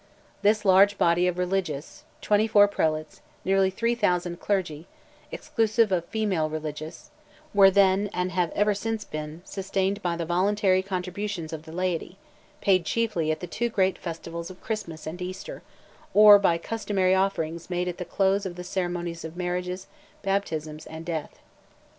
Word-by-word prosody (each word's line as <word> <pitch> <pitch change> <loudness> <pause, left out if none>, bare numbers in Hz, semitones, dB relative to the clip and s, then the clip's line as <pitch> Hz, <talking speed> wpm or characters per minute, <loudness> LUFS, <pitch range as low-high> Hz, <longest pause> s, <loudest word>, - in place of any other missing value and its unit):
This 210 +1 +2
large 195 +1 +6
body 170 +1 +3
of 180 -1 -1
religious—24 195 +4 +1
prelates, 155 -4 -1 0.2
nearly 195 0 +3
3,000 180 -5 0
clergy—exclusive 205 +5 -2
of 175 -2 +1
female 190 -8 -1
religious—were 155 +5 -1
then, 195 +1 +3
and 180 -1 -2
have 175 -2 +1
ever 210 0 +3
since 220 +2 -3
been, 155 +2 -7
sustained 195 +1 -2
by 175 -2 -1
the 170 0 -3
voluntary 185 +2 +2
contributions 185 -2 -4
of 160 0 -7
the 160 - -10
laity, 180 +1 -2 0.4
paid 185 -3 +3
chiefly 195 -6 0
at 155 - -3
the - - -3
two 235 +7 -2
great 190 -4 +1
festivals 170 0 -6
of 185 - -12
Christmas 195 -8 -5
and 165 +3 -6
Easter, 185 +1 -6 0.5
or 210 -1 +9
by 170 -4 +3
customary 195 -1 0
offerings 170 -4 -1
made 180 0 -1
at 180 0 -4
the - - -2
close 195 +2 +1
of 185 -3 -5
the 180 - -7
ceremonies 175 -2 -3
of 160 +1 -8
marriages, 180 +1 -3 0.4
baptisms, 160 -6 -2
and 160 +1 -8
death. 160 -3 -4
185 Hz, 145 wpm, -26 LUFS, 170-200 Hz, 0.5 s, or